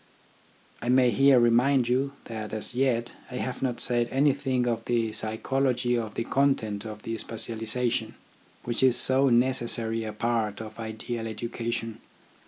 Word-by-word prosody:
I 120 - -3
may 125 -1 +5
here 135 +3 +5
remind 120 +2 +3
you 135 +3 0
that 110 -2 -6
as 110 +2 -2
yet 120 -2 0 0.2
I 125 - -7
have 125 0 -4
not 125 -3 -1
said 120 -1 +1
anything 135 -2 +1
of 115 -2 -1
the 115 -2 0
psychology 125 +3 0
or 115 -2 -2
the 115 - -4
content 115 -6 0
of 105 -1 -8
the 115 0 -4
specialism, 115 +1 -1 0.5
which 120 -1 -1
is 130 -2 +6
so 135 +1 +4
necessary 120 -2 +1
a 110 - -4
part 110 -1 -1
of 110 0 -9
an 115 - -4
ideal 115 +1 -5
education. 115 0 -4
120 Hz, 155 wpm, -27 LUFS, 110-130 Hz, 0.5 s, is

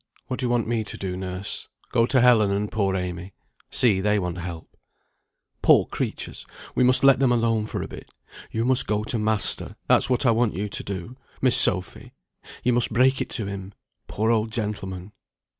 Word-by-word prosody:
"What 130 - -5
do 130 - 0
you - - -2
want 120 -2 0
me 115 -1 0
to 105 - -8
do, 95 -2 -4
nurse? 95 +1 -5 0.2
Go 115 -1 +3
to 130 -1 +3
Helen 120 -4 +5
and 100 +1 -1
poor 100 -3 0
Amy. 90 0 -5 0.4
See, 105 -6 +3
they 105 +1 +2
want 90 -2 -3
help." 85 -2 -8 0.9
"Poor - - +5
creatures! - - -5 0.3
we - - +2
must 125 +1 +4
let 135 -1 +6
them 135 -3 +3
alone 115 -2 +1
for - - -4
a - - -6
bit. - - -11 0.4
You 115 +1 -2
must 130 0 +2
go 105 0 0
to 115 +1 -2
master; 110 -1 -1
that's 125 - +4
what 125 +2 +1
I 120 - +5
want 115 -1 +1
you 105 +2 -3
to - - -4
do, 100 +6 -6 0.2
Miss 130 -2 +4
Sophy. 90 -1 +2 0.5
You 125 - +2
must 120 0 +2
break 130 +4 +3
it - - -3
to 110 - -2
him, 100 0 -7 0.3
poor 110 +2 0
old 110 -1 0
gentleman. 105 -4 -4
110 Hz, 195 wpm, -24 LUFS, 95-120 Hz, 0.9 s, let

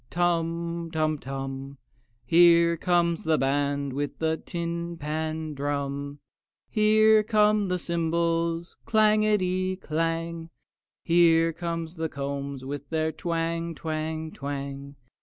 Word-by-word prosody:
Tum, 170 -1 -1
tum 155 -2 0
tum! 135 0 -6 0.5
Here 170 +3 +6
comes 170 0 +1
the 160 -1 +2
band 140 0 0
with 145 +1 -3
a 160 0 +2
tin 170 0 -4
pan 155 +1 -3
drum; 140 0 -3 0.5
Here 215 0 +5
come 210 -1 +3
the 180 0 0
cymbals, 170 0 -1
clangety 210 -4 +2
clang! 165 -1 -2 0.5
Here 165 -1 +4
come 165 0 -3
the 160 0 -4
combs 140 -1 -5
with 145 0 -6
their 160 -1 0
twang, 165 +1 -2
twang, 160 0 -3
twang! 140 -1 -6
165 Hz, 105 wpm, -26 LUFS, 145-170 Hz, 0.5 s, Here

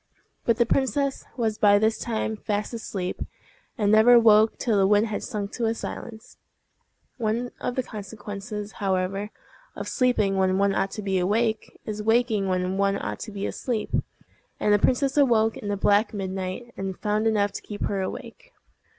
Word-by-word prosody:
But 230 -2 +3
the 235 - +4
princess 275 +2 0
was 220 -3 -1
by 205 -1 +6
this 220 +1 +1
time 220 -1 -2
fast 210 +1 -3
asleep, 195 -5 -4 0.6
and 205 -3 +2
never 230 +3 +7
woke 220 -1 +5
till 230 -4 0
the 195 -1 +4
wind 205 +2 +4
had 215 -2 -3
sunk 205 -1 -4
to 230 -2 0
silence. 225 -1 -8 0.8
One 235 +1 -1
of 245 - -3
the 260 - 0
consequences, 210 0 -7
however, 195 +1 -1 0.5
of - - -6
sleeping 215 -6 +1
when 190 0 +2
one 200 0 +2
ought 195 - 0
to 210 - -5
be 190 -1 0
awake 220 +4 0
is 210 -1 -4
waking 225 -2 +2
when 185 +1 -1
one 200 0 +2
ought - - -4
to 220 - -7
be 200 -1 -4
asleep; 235 -4 -3 0.7
and 210 - +3
the 205 - +4
princess 270 +5 +1
awoke 225 -6 +4
in 205 - -7
the 200 - -1
black 205 +2 +2
midnight, 190 +4 -4
and 195 -1 -4
found 215 +1 0
enough 205 -2 +2
to - - -6
keep 205 -1 -6
her 195 -1 -1
awake. - - -7
210 Hz, 175 wpm, -25 LUFS, 200-230 Hz, 0.8 s, never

